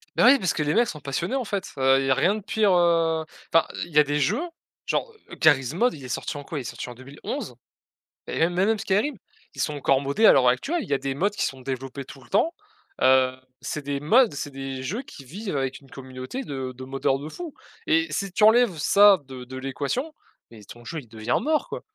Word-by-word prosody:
Ben - - +5
oui 275 +2 +8
parce 185 -7 0
que - - -2
les 150 0 0
mecs 235 0 +4
sont 150 - -6
passionnés, 145 - -3
en 265 - 0
fait, 200 -3 -4
heu, 135 0 +4
il 135 - -1
y 135 - +1
a - - +7
rien 175 +10 +2
de - - -4
pire, 210 0 +1
heu, 165 -2 +3 0.3
enfin 165 - +5 0.2
il 170 - -15
y 150 - 0
a 150 - +8
des 145 +1 -1
jeux, 150 - +1 0.4
genre 465 - -1 0.3
Gary's 140 -3 +4
mode, 240 +8 +1
il 140 - -11
est - - -6
sorti 145 - -3
en 145 - -7
quoi, 145 +1 -5
Il - - -4
est - - -8
sorti 120 - -6
en 125 - -7
2011? 130 0 -7 0.7
Et - - -4
même 165 +2 +2
même 200 +5 +2
Skyrim, 210 +7 0 0.4
ils - - -3
sont 150 - -1
encore 135 -2 +2
modés 140 +11 +3
à - - +9
l'heure 130 -2 +4
actuelle, 290 - +1
il - - -10
y - - +1
a 135 - +1
des 135 -1 -3
mods 195 +8 +1
qui 205 - -1
sont 135 -1 -5
développés 135 +1 -5
tout 135 0 -12
le - - -20
temps, 320 - +2 0.5
heu, 130 0 +5 0.3
c'est 150 - -4
des 140 0 -2
mods, 230 - +5
c'est 145 0 -5
des 135 -1 -5
jeux 205 - -3
qui 140 - -13
vivent 190 - -5
avec 135 -1 -2
une 135 - -20
communauté 130 - -7
de 130 - -5
de 130 - -10
moddeur 135 0 0
de 145 +2 -7
fou 330 - -8 0.3
et 325 0 +3
si 195 -1 -2
tu 195 - 0
enlèves 220 -4 +5
ça 200 +5 +6
de 130 -1 -9
de 130 +1 -8
l'équation 140 - -3 0.4
mais 110 -2 -13
ton 120 +3 -13
jeu, 160 +5 -5
il 125 - -13
devient 110 +2 -1
mort, 310 +1 0
quoi. - - -5
145 Hz, 250 wpm, -25 LUFS, 135-205 Hz, 0.7 s, à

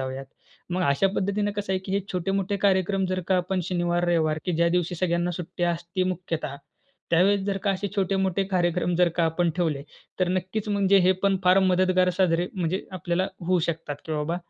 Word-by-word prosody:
जाऊयात. 130 +1 -5 0.4
मग 180 +1 0
अशा 140 +7 +3
पद्धतीनं 205 +1 0
कसं 205 -2 -2
आहे, 190 - +1
की 190 0 -6
हे 200 - +2
छोटे-मोठे 195 +2 -1
कार्यक्रम 195 0 +2
जर 185 0 -1
का 190 - +3
आपण 180 +1 -1
शनिवार, 175 -1 0
रविवार, 160 -2 +2
की 180 - -1
ज्या 170 +1 +2
दिवशी 175 0 0
सगळ्यांना 175 0 0
सुट्टी 175 +1 -6
असती 175 +1 -1
मुख्यतः, 175 -6 -3 0.5
त्यावेळेस 195 +4 +4
जर 200 -1 -1
का 200 - +2
असे 195 +1 -2
छोटे-मोठे 195 -1 +1
कार्यक्रम 175 -1 +1
जर 180 0 +4
का 170 - +3
आपण 165 +2 +1
ठेवले, 160 -6 0 0.4
तर 185 - +2
नक्कीच 185 +4 -2
म्हणजे 200 -1 +4
हे 185 - +6
पण 195 -1 +3
फार 185 +1 +6
मदतगार 185 -1 +3
साजरे 175 -2 +2
म्हणजे 185 0 -2
आपल्याला 180 +1 -1 0.2
होऊ 185 0 +3
शकतात, 165 -3 -3
की 160 - -3
बाबा 150 +3 -1
180 Hz, 190 wpm, -25 LUFS, 170-190 Hz, 0.5 s, हे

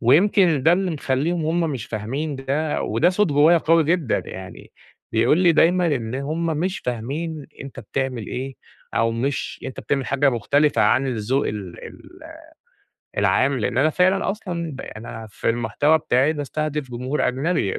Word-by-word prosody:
ويمكن 165 - +4
ده 160 - +5
اللي 185 +1 +1
مخليهم 155 +3 -1
هم 165 +2 +1
مش 125 -5 -5
فاهمين 135 +8 -3
ده، 140 +3 -1
وده 135 +12 +2
صوت 210 +3 +2
جوّايا 155 +4 +5
قوي 165 0 +3
جدًا، 160 -5 +1
يعني 95 0 -10 0.4
بيقول 115 +8 +3
لي 180 -2 +5
دايمًا 175 +3 +4
إن 125 -7 -1
همّ 155 +5 -2
مش 185 +3 -1
فاهمين 140 +6 -4 0.2
أنت 135 -1 -9
بتعمل 130 0 -3
إيه، 135 +1 -5 0.4
أو 115 0 +2
مش 135 +5 -3
أنت 130 - -6
بتعمل 135 -3 -1
حاجة 140 +1 +2
مختلفة 140 +5 +2
عن 130 +2 +3
الذوق 125 +3 0
ال 100 -5 -6
ال - - -14 1.0
العام. 135 -1 +2
لأن 120 +2 -1
أنا 145 +4 +4
فعلًا 185 +4 +2
أصلًا 175 -6 -5
ب 135 - -7
أنا 110 0 -8
في 105 - -3
المحتوى 120 +7 +2
بتاعي 140 0 +2
باستهدف 150 -1 -3
جمهور 125 +4 -1
أجنبي، 130 - 0
140 Hz, 160 wpm, -22 LUFS, 125-160 Hz, 1.0 s, ده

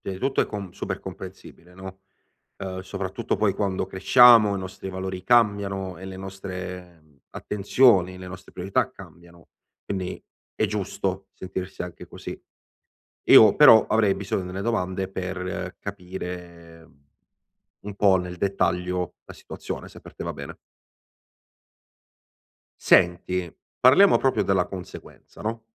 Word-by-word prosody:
pia 95 - -5
i 95 - -7
tutto 135 +3 0
è - - +1
com 100 -4 -6
super - - -5
comprensibile, 90 +2 -11
no? 95 +1 -10 0.6
Uhm, 95 -1 -5
soprattutto 95 - -4
poi 100 -1 +1
quando 95 -2 -1
cresciamo, 105 +2 +6
i - - -3
nostri 95 0 -7
valori 95 0 -5
cambiano 100 -5 +1
e 95 - -9
le 95 0 -8
nostre, 90 -2 -8
mhmm, 75 -2 -28
attenzioni, 100 -3 +2
le 95 - -9
nostre 90 0 -10
priorità 95 +7 -1
cambiano. 85 -6 -16 0.3
Quindi 95 -2 -4 0.4
è - - +1
giusto 95 -1 -3
sentirsi 95 0 -6
anche 90 -1 -9
così. - - -8 0.9
Io 110 -2 +8
però, 120 -7 +8
avrei 105 -3 +2
bisogno 95 -1 -3
delle 95 +2 -5
domande 95 -4 -2
per 90 -1 -5
capire, 90 -3 -8
mhmm, 70 -3 -27 0.8
un 100 0 -8
po' 100 -2 +4
nel 90 -1 -5
dettaglio 90 -2 -1
la - - -11
situazione, - - -8
se - - -14
per - - -14
te - - -7
va - - -3
bene. - - -9 2.2
Senti, 90 0 +2 0.3
parliamo 160 +11 +6
proprio 135 - +1
della 95 -2 +1
conseguenza, 90 -2 -11
no? 115 +1 -4
95 Hz, 135 wpm, -24 LUFS, 90-100 Hz, 2.2 s, Io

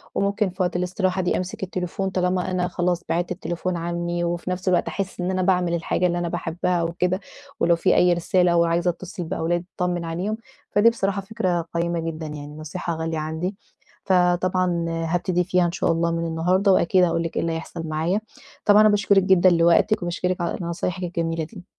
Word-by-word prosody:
وممكن 200 0 +1
في 185 +1 -2
وقت 180 0 -1
الاستراحة 185 +1 0
دي 180 - 0
أمسك 185 +1 -5
التليفون 185 +1 -3
طالما 185 0 0
أنا 180 -1 0
خلاص 175 -1 -1
بعدت 175 +1 0
التليفون 175 +1 -3
عني 175 +1 -2
وفي 175 +1 -2
نفس 185 +1 -4
الوقت 180 - +2
أحس 195 -2 -4
إن 180 +1 -1
أنا 185 0 0
باعمل 180 -1 +2
من 170 - -1
الحاجة 180 +2 0
اللي 175 0 -1
أنا 175 -1 -1
باحبها 175 +1 -1
وكده 180 +3 0 0.4
ولو 170 0 +4
في 170 - +2
أي 180 0 +5
رسالة 175 +1 +2
أو 170 0 +4
عايزة 170 +1 +1
أتصل 180 +1 -5
بأولاد 170 +1 -1
أطمن 175 -1 -1
عليهم، 185 +7 -2 0.3
فدي 205 +3 +5
بصراحة 200 -3 -1
فكرة 185 -5 -1
قيّمة 170 0 0
جدًًا 165 -1 -4
يعني 150 0 -8
نصيحة 165 +2 -4
غالية 160 0 -3
عندي. 160 +5 -3 0.5
فطبعًا 180 -1 +2
هابتدي 175 +2 0
فيها 180 0 +2
إن 170 - 0
شاء 175 - 0
الله 165 0 +1
من 170 0 -1
النهاردة 180 +5 +2
وأكيد 180 +1 +4
هاقول 170 -1 +1
لِك 165 - -5
إيه - - +1
اللي 165 0 -1
هيحصل 165 0 -6
معايا. 165 +7 0 0.4
طبعًا 210 +1 +7
أنا 215 - +6
باشكرك 200 -2 +3
جدًًا 190 -1 +5
لوقتِك 170 +5 +3
وباشكرِك 180 +1 -1
على 170 - -1
نصايحِك 175 +2 -3
الجميلة 165 -2 -2
دي. 180 +2 -10
175 Hz, 195 wpm, -23 LUFS, 170-185 Hz, 0.5 s, طبعًا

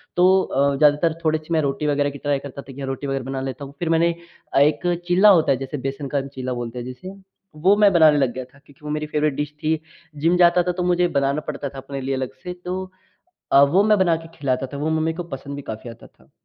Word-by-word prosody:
तो 185 +2 +5
अ, 140 +1 +1
ज़्यादातर 150 +3 +3
थोड़ी-सी 155 +1 -1
मैं 160 - +3
रोटी 140 +1 -1
वग़ैरह 145 0 +1
की 140 - -9
ट्राई 145 0 -1
करता 140 0 -8
था 135 - -12
कि 140 +1 -7
रोटी 135 +1 -4
वग़ैरह 135 -1 -2
बना 135 0 -4
लेता 135 +2 -5
हूँ 140 - -12
फ़िर 170 - -2
मैंने 165 +1 +3 0.4
अ, - - +4
एक 170 +4 +2
चीला 185 +4 +6
होता 155 - +1
है 135 - +2
जैसे 135 +2 -5
बेसन 140 +1 -5
का 140 - +2
चीला 130 -2 -5
बोलते 120 +1 -6
हैं 120 - -6
जिसे। 185 +10 -8 0.4
वो 185 +7 +4
मैं 205 -1 +6
बनाने 155 -3 +6
लग 135 -4 +2
गया 130 0 -5
था 140 +3 -22
क्योंकि 145 -1 -22
वो - - -5
मेरी 150 0 -2
फ़ेवरेट 150 -1 0
डिश 150 0 -3
थी। 155 0 +1 0.4
जिम 170 +2 +3
जाता 175 0 +5
था 180 - 0
तो 180 - 0
मुझे 180 0 +2
बनाना 140 -1 0
पड़ता 140 - -4
था 140 - -12
अपने 135 +1 -6
लिए 135 +1 -2
अलग 130 -1 -4
से। 180 - -5
तो 185 +1 -3 0.7
अ, 140 - +7
वो 175 +8 +4
मैं 215 -1 +4
बना 175 -3 +3
के 165 0 -11
खिलाता 135 -2 -1
था - - -5
वो 150 +3 -2
मम्मी 160 +1 0
को 175 - -4
पसंद 140 +1 -7
भी 140 - -7
काफ़ी 110 +2 -8
आता 115 - -13
था। - - -26
145 Hz, 260 wpm, -22 LUFS, 135-170 Hz, 0.7 s, अ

